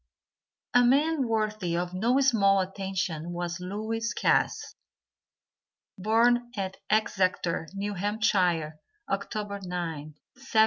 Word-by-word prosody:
A 245 Hz, -, +6 dB
man 280 Hz, +2 st, +3 dB
worthy 215 Hz, -6 st, -1 dB
of 175 Hz, +1 st, -2 dB
no 235 Hz, +8 st, +2 dB
small 200 Hz, -7 st, +4 dB
attention 190 Hz, -3 st, -3 dB
was 175 Hz, 0 st, -3 dB
Lewis 220 Hz, +5 st, -3 dB
Cass. -, -, +1 dB, 1.2 s
Born 240 Hz, +4 st, +2 dB
at 190 Hz, -1 st, -3 dB
Exeter, 185 Hz, -6 st, +1 dB
New 205 Hz, +1 st, -2 dB
Hampshire, 180 Hz, -6 st, +1 dB, 0.3 s
October 205 Hz, -2 st, -3 dB
9th, 165 Hz, -5 st, -5 dB, 0.2 s
1782. 260 Hz, -4 st, -1 dB
200 Hz, 100 wpm, -28 LUFS, 180-225 Hz, 1.2 s, A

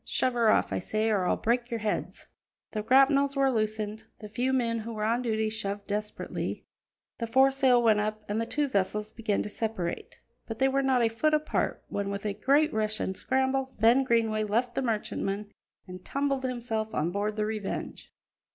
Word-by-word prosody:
Shove 255 Hz, -, 0 dB
her 235 Hz, -2 st, +3 dB
off, -, -, +2 dB
I -, -, 0 dB
say, 215 Hz, +4 st, 0 dB
or 190 Hz, -4 st, +1 dB
I'll -, -, +2 dB
break 240 Hz, +1 st, 0 dB
your 230 Hz, -2 st, -3 dB
heads." 210 Hz, -1 st, -3 dB, 0.5 s
The 215 Hz, -, -2 dB
grapnels 275 Hz, +4 st, +4 dB
were 275 Hz, -1 st, +3 dB
loosened; 215 Hz, -1 st, -2 dB
the 210 Hz, -, -8 dB
few 245 Hz, +5 st, -1 dB
men 235 Hz, -3 st, +1 dB
who 230 Hz, +1 st, -6 dB
were 215 Hz, -1 st, -3 dB
on 230 Hz, +3 st, +1 dB
duty 220 Hz, -2 st, 0 dB
shoved 205 Hz, -2 st, -4 dB
desperately; 210 Hz, +1 st, -4 dB, 0.5 s
the 230 Hz, -, -2 dB
foresail 265 Hz, 0 st, +4 dB
went 220 Hz, -2 st, +4 dB
up, 215 Hz, +1 st, -2 dB
and 210 Hz, +2 st, -1 dB
the 230 Hz, -, -3 dB
two 295 Hz, +2 st, 0 dB
vessels 210 Hz, -1 st, -1 dB
began 215 Hz, -3 st, -1 dB
to -, -, -5 dB
separate. 210 Hz, -6 st, -4 dB, 0.3 s
But 225 Hz, -, -5 dB
they 265 Hz, +2 st, +3 dB
were 275 Hz, +1 st, +1 dB
not 260 Hz, -3 st, +2 dB
a -, -, +4 dB
foot 305 Hz, +8 st, +1 dB
apart 305 Hz, 0 st, -1 dB
when, 200 Hz, -1 st, -3 dB
with 200 Hz, +1 st, -4 dB
a 205 Hz, -, 0 dB
great 285 Hz, +8 st, +2 dB
rush 215 Hz, 0 st, 0 dB
and 190 Hz, -, -2 dB
scramble, 265 Hz, +2 st, 0 dB
Ben 235 Hz, +5 st, +5 dB
Greenway 225 Hz, -3 st, +1 dB
left 235 Hz, +4 st, 0 dB
the 270 Hz, -, -1 dB
merchantman 210 Hz, -3 st, -2 dB, 0.4 s
and 180 Hz, 0 st, -9 dB
tumbled 275 Hz, +1 st, -1 dB
himself 230 Hz, -3 st, -3 dB
on 160 Hz, +3 st, 0 dB
board 205 Hz, +2 st, -2 dB
the 210 Hz, 0 st, 0 dB
Revenge. 215 Hz, -2 st, -5 dB
225 Hz, 195 wpm, -28 LUFS, 210-260 Hz, 0.5 s, Ben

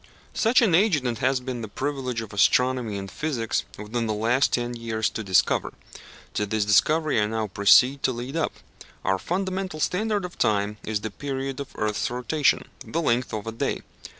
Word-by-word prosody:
Such 235 Hz, +2 st, +3 dB
an 200 Hz, -7 st, +3 dB
agent 170 Hz, -, +3 dB
it 120 Hz, -2 st, -1 dB
has 130 Hz, 0 st, +2 dB
been 125 Hz, -1 st, -5 dB
the 110 Hz, -, -5 dB
privilege 130 Hz, 0 st, -3 dB
of 110 Hz, -2 st, -9 dB
astronomy 125 Hz, +1 st, +2 dB
and 95 Hz, -1 st, -6 dB
physics, 130 Hz, -8 st, -2 dB
within 115 Hz, +3 st, -3 dB
the 110 Hz, -, -1 dB
last 120 Hz, +5 st, +2 dB
ten 120 Hz, 0 st, -1 dB
years, 115 Hz, -2 st, -1 dB
to 110 Hz, -, -4 dB
discover. 95 Hz, -3 st, +2 dB, 0.6 s
To 105 Hz, -, -1 dB
this 110 Hz, 0 st, 0 dB
discovery 150 Hz, +6 st, +3 dB
I 105 Hz, -, +1 dB
now 110 Hz, 0 st, -1 dB
proceed 115 Hz, +7 st, +5 dB
to -, -, +2 dB
lead 125 Hz, +4 st, -6 dB
up. 165 Hz, -, 0 dB, 0.5 s
Our 95 Hz, 0 st, +1 dB
fundamental 185 Hz, -, -3 dB
standard 205 Hz, +4 st, 0 dB
of 180 Hz, -, -10 dB
time 105 Hz, 0 st, +1 dB
is 105 Hz, -1 st, -2 dB
the 110 Hz, -, -4 dB
period 135 Hz, +2 st, -4 dB
of 140 Hz, -, -6 dB
the -, -, -17 dB
earth's 105 Hz, -1 st, 0 dB
rotation 125 Hz, +5 st, +1 dB, 0.2 s
the 165 Hz, -, -3 dB
length 125 Hz, -6 st, +1 dB
of 105 Hz, -1 st, -3 dB
the 115 Hz, -, -5 dB
day. 115 Hz, -, -2 dB
120 Hz, 190 wpm, -25 LUFS, 110-145 Hz, 0.6 s, proceed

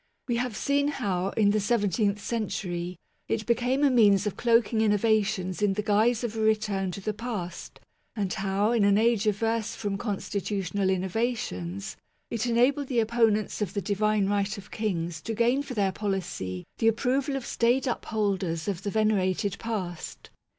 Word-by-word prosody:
We 240 Hz, -2 st, 0 dB
have 245 Hz, -2 st, -2 dB
seen 285 Hz, 0 st, +1 dB
how, 195 Hz, -10 st, -1 dB
in 205 Hz, -2 st, +4 dB
the 215 Hz, -, +2 dB
seventeenth 205 Hz, -1 st, +1 dB
century, 180 Hz, -6 st, -3 dB, 0.3 s
it 215 Hz, -, -1 dB
became 245 Hz, +4 st, +1 dB
a 280 Hz, -, +5 dB
means 205 Hz, -5 st, +5 dB
of 210 Hz, -, -2 dB
cloaking 230 Hz, -1 st, +2 dB
innovations 210 Hz, -3 st, +1 dB
in 205 Hz, -2 st, +3 dB
the 210 Hz, +2 st, -2 dB
guise 220 Hz, +3 st, +2 dB
of 230 Hz, -2 st, -3 dB
a -, -, -3 dB
return 215 Hz, -3 st, +1 dB
to 200 Hz, -, -6 dB
the 215 Hz, +2 st, -2 dB
past, 205 Hz, -6 st, -6 dB, 0.4 s
and 200 Hz, -4 st, -1 dB
how 200 Hz, +1 st, 0 dB
in 235 Hz, -3 st, +3 dB
an 200 Hz, 0 st, +4 dB
age 225 Hz, -1 st, +2 dB
averse 225 Hz, +2 st, 0 dB
from 200 Hz, -2 st, -3 dB
constitu 200 Hz, -2 st, -2 dB
tional 195 Hz, +1 st, 0 dB
innovations, 185 Hz, -, -2 dB, 0.3 s
it 230 Hz, +1 st, -1 dB
enabled 255 Hz, +4 st, +2 dB
the 250 Hz, -3 st, +1 dB
opponents 220 Hz, -2 st, +1 dB
of 200 Hz, -1 st, -2 dB
the 200 Hz, -, 0 dB
Divine 205 Hz, +1 st, +1 dB
Right 205 Hz, +1 st, 0 dB
of 200 Hz, 0 st, -11 dB
Kings 170 Hz, -7 st, -2 dB
to 225 Hz, -, -4 dB
gain 240 Hz, +5 st, +2 dB
for 270 Hz, -3 st, -7 dB
their 200 Hz, -3 st, +2 dB
policy 180 Hz, -, -3 dB
the 225 Hz, -, +3 dB
approval 260 Hz, +5 st, +1 dB
of 265 Hz, -3 st, -4 dB
staid 240 Hz, +3 st, +2 dB
upholders 200 Hz, -8 st, -1 dB
of 195 Hz, -3 st, -2 dB
the 200 Hz, -, -3 dB
venerated 200 Hz, -2 st, +1 dB
past. 190 Hz, -7 st, -5 dB
210 Hz, 170 wpm, -27 LUFS, 195-230 Hz, 0.4 s, a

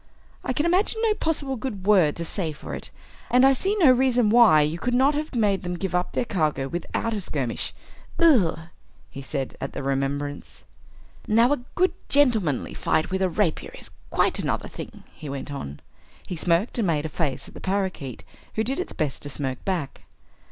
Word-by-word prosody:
I -, -, -1 dB
can 295 Hz, +5 st, 0 dB
imagine 375 Hz, +6 st, +2 dB
no 440 Hz, -2 st, +4 dB
possible 290 Hz, -8 st, -2 dB
good 215 Hz, -6 st, -5 dB
word 185 Hz, -8 st, +4 dB
to 170 Hz, -, -4 dB
say 165 Hz, -2 st, -2 dB
for -, -, -8 dB
it. -, -, -6 dB, 0.4 s
And 250 Hz, +2 st, +5 dB
I 270 Hz, -, +6 dB
see 385 Hz, +10 st, 0 dB
no 330 Hz, -11 st, +6 dB
reason 250 Hz, -3 st, +3 dB
why 225 Hz, -10 st, +7 dB
you 155 Hz, +3 st, 0 dB
could 245 Hz, +4 st, 0 dB
not 270 Hz, +4 st, +4 dB
have 300 Hz, -1 st, -3 dB
made 205 Hz, -4 st, +2 dB
them 180 Hz, -1 st, -3 dB
give 190 Hz, 0 st, -3 dB
up 180 Hz, 0 st, 0 dB
their -, -, 0 dB
cargo 155 Hz, -, 0 dB
without 175 Hz, +8 st, -3 dB
a 210 Hz, -, -2 dB
skirmish. 135 Hz, -9 st, -3 dB, 0.5 s
Ugh!" 240 Hz, -, +4 dB, 0.5 s
he 140 Hz, -, -7 dB
said, 135 Hz, -1 st, -4 dB
at 135 Hz, -, -4 dB
the -, -, -5 dB
remembrance. 140 Hz, +1 st, -3 dB, 0.6 s
"Now, 230 Hz, +5 st, +4 dB
a -, -, 0 dB, 0.2 s
good 370 Hz, +1 st, +3 dB, 0.2 s
gentlemanly 220 Hz, -, +2 dB
fight 155 Hz, +3 st, 0 dB
with 190 Hz, 0 st, -1 dB
a 190 Hz, -, +2 dB
rapier 175 Hz, -2 st, -1 dB
is -, -, -12 dB, 0.2 s
quite -, -, +1 dB
another -, -, -1 dB
thing," -, -, -9 dB
he 150 Hz, -, -9 dB
went 140 Hz, +1 st, -5 dB
on. 70 Hz, -, -7 dB, 0.4 s
He 180 Hz, -, -5 dB
smirked 175 Hz, +8 st, +1 dB
and 215 Hz, -, +1 dB
made 155 Hz, -2 st, 0 dB
a -, -, 0 dB
face 155 Hz, -3 st, -2 dB
at -, -, -14 dB
the -, -, -10 dB
parakeet 190 Hz, -, -2 dB, 0.3 s
who 220 Hz, -, +1 dB
did 265 Hz, +7 st, -1 dB
its 365 Hz, -, -4 dB
best 150 Hz, -4 st, -2 dB
to 145 Hz, -, -5 dB
smirk 135 Hz, -2 st, -4 dB
back. 175 Hz, -8 st, -2 dB
190 Hz, 195 wpm, -25 LUFS, 150-250 Hz, 0.6 s, why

